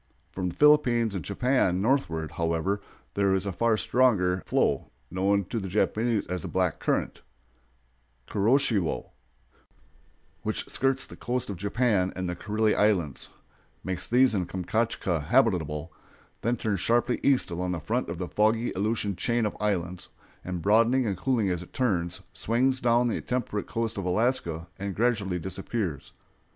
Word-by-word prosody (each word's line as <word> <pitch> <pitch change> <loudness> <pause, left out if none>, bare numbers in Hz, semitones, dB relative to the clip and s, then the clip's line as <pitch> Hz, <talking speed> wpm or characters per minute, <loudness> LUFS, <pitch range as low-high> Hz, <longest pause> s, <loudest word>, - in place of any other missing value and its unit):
From 90 -1 -2
the - - -9
Philippines 125 -7 +4
and 95 -5 -4
Japan 100 -4 +1
northward, 90 - 0
however, 85 +4 -1 0.3
there 100 -1 +2
is 95 +1 -1
a 100 - -1
far 110 +4 +1
stronger 100 -8 +2
flow, - - +1 0.2
known 100 +1 +1
to 115 - -1
the 95 - -5
Japanese 110 +3 +1
as 90 -1 -4
the - - -6
Black - - 0
Current - - -1 1.1
(Kuroshiwo), 110 - +1 1.3
which - - -3
skirts 135 0 +1
the - - -12
coast 125 -3 -2
of - - -4
Japan 100 -1 +1
and 95 0 -3
the 90 - -3
Kurile 110 +3 0
Islands, 95 -10 +1 0.5
makes 95 -1 -3
these 125 0 +4
and 90 -4 -1
Kamchatka 95 -2 -1
habitable, 85 - +1 0.5
then 120 +2 0
turns 105 -4 -1
sharply 120 +5 +1
east 135 -9 +2
along 90 +1 -2
the 85 - -2
front 120 +7 -2
of 85 - -4
the 90 0 -4
foggy 110 +4 +1
Aleutian 105 0 -1
chain 120 +4 0
of 105 - -2
islands, 90 -4 -2 0.3
and 90 -2 -4
broadening 115 +6 +4
and 100 -3 0
cooling 110 0 0
as 90 -1 -2
it 90 - -13
turns, 90 -10 0
swings 130 +4 +1
down 120 0 +3
the 115 - -1
temperate 120 -5 -2
coast 115 -3 -2
of 95 - -4
Alaska 90 -5 0
and 100 -1 -4
gradually 105 -6 +1
disappears. 95 - -4
105 Hz, 155 wpm, -27 LUFS, 90-120 Hz, 1.3 s, Philippines